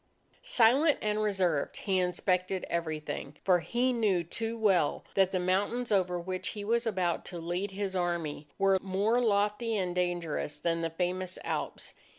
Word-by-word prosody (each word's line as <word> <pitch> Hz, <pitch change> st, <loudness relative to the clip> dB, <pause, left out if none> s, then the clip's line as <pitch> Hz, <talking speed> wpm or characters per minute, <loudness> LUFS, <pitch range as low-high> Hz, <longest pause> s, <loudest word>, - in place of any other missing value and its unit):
Silent 290 Hz, -, +4 dB
and 210 Hz, 0 st, 0 dB
reserved, 185 Hz, -8 st, 0 dB
he 190 Hz, -2 st, 0 dB
inspected 185 Hz, +1 st, 0 dB
everything. 155 Hz, -3 st, -3 dB
For 180 Hz, -2 st, +4 dB
he 245 Hz, +9 st, 0 dB
knew 205 Hz, -7 st, +2 dB
too 225 Hz, +7 st, -4 dB
well 195 Hz, -9 st, +2 dB
that 190 Hz, -1 st, +4 dB
the 185 Hz, -, -1 dB
mountains 205 Hz, +7 st, 0 dB
over 180 Hz, -3 st, +2 dB
which 185 Hz, +1 st, -4 dB
he 205 Hz, -, -4 dB
was 235 Hz, +2 st, +1 dB
about 185 Hz, -5 st, 0 dB
to 175 Hz, -, -6 dB
lead 175 Hz, +4 st, -2 dB
his 195 Hz, 0 st, -4 dB
Army, 170 Hz, -5 st, -2 dB
were 195 Hz, -1 st, +3 dB
more 200 Hz, +5 st, +1 dB
lofty 210 Hz, +1 st, +1 dB
and 180 Hz, -2 st, -1 dB
dangerous 175 Hz, -4 st, -2 dB
than 165 Hz, +1 st, -1 dB
the 165 Hz, -, -1 dB
famous 180 Hz, +2 st, -2 dB
Alps. -, -, -4 dB
185 Hz, 160 wpm, -30 LUFS, 175-210 Hz, -, Silent